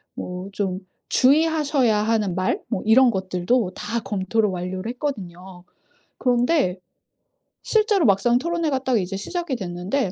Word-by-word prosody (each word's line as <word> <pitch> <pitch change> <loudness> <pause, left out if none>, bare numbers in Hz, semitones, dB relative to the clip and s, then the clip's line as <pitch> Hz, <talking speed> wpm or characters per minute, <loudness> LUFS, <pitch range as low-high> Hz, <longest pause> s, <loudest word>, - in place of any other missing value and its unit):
뭐 180 +2 -6
좀 195 -2 -2 0.3
주의하셔야 285 -4 +3
하는 215 -5 0
말 185 0 0
뭐 - - -2
이런 245 +4 +6
것들도 190 +2 0
다 230 +3 -3
검토를 210 +2 0
완료를 185 +3 -4
했거든요. 190 - -6 0.6
그런데 245 - +1 0.9
실제로 430 -5 +2
막상 220 +4 +3
토론회가 325 -1 -1
딱 260 -2 +1
이제 190 +1 -3
시작이 340 - -3
됐는데 185 +4 -2
220 Hz, 285 characters per minute, -23 LUFS, 185-265 Hz, 0.9 s, 이런